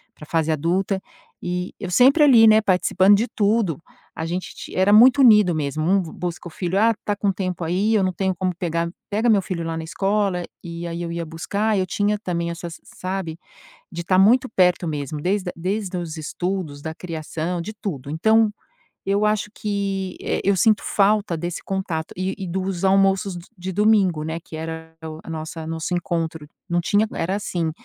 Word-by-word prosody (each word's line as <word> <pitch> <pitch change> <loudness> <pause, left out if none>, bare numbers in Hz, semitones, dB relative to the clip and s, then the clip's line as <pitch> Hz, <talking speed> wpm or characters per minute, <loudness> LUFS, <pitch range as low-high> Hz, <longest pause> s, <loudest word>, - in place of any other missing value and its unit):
pra 150 - -11
fase 160 0 0
adulta, 180 +5 0 0.4
e 180 +1 -3
eu 190 -3 -5
sempre, 270 - +6
ali, 240 -6 +7
né, 220 0 +6
participando 190 +1 +4
de 225 +4 +1
tudo, 205 - +1 0.3
a 160 - -4
gente 180 +2 -4
ti - - -9
era 190 +2 +3
muito 250 +6 +7
unido 210 -8 +6
mesmo, 150 0 -2
um 195 +2 +3
b 165 - -7
busca 175 0 -5
o 170 - -10
filho: 180 +3 -1
"Ah, 225 +2 +4
tá 205 - 0
com 200 -1 0
tempo 185 -3 -3
aí, 190 +7 +1
eu 205 -3 +3
não 185 - +1
tenho 190 +1 -1
como 185 0 -1
pegar 170 -1 -2 0.2
pega 220 +4 +1
meu 210 -3 +5
filho 180 -3 -4
lá 165 0 -3
na 160 - -4
escola.", 195 +1 0 0.2
e 170 0 -7
e 175 - -4
aí, 170 +1 -4
eu 170 - -4
ia 170 0 -3
buscar, 200 +6 -1
eu 185 - +1
tinha 205 +2 0
também 170 -4 -2
essas 170 0 -7
sabe, 185 -3 -5 0.5
de 170 0 -5
tá 185 +1 +2
muito 245 +6 +5
perto 180 -3 +2
mesmo, 145 -1 -4
desde 185 0 -1
desde 190 +2 -3
os 165 -2 -5
estudos, 165 -2 -4
da 160 +1 -5
criação, 165 0 -4
de 215 +5 -6
tudo. 150 - -6
Então, 220 +6 +3 0.5
eu 200 +2 +1
acho 210 0 0
que, 195 -3 -3
eh, - - -1
eu 200 0 +3
sinto 215 +3 +3
falta 205 -2 +2
desse 175 +1 -4
contato 185 -5 -3
e 185 +1 -2
e 190 - -5
dos 185 +1 -2
almoços 195 0 +3
d 170 - -9
de 185 +1 -5
domingo, 200 -6 +3
né, 160 +2 -4
que 160 - -11
era 160 0 -7
o 155 0 -7
a - - -11
nossa 160 0 -6
nosso 165 +2 -3
encontro, 165 -3 -3 0.2
não 175 - +1
tinha 205 +4 +2
era 180 +4 -1
assim, 175 -5 -2
185 Hz, 200 wpm, -22 LUFS, 165-200 Hz, 0.5 s, ali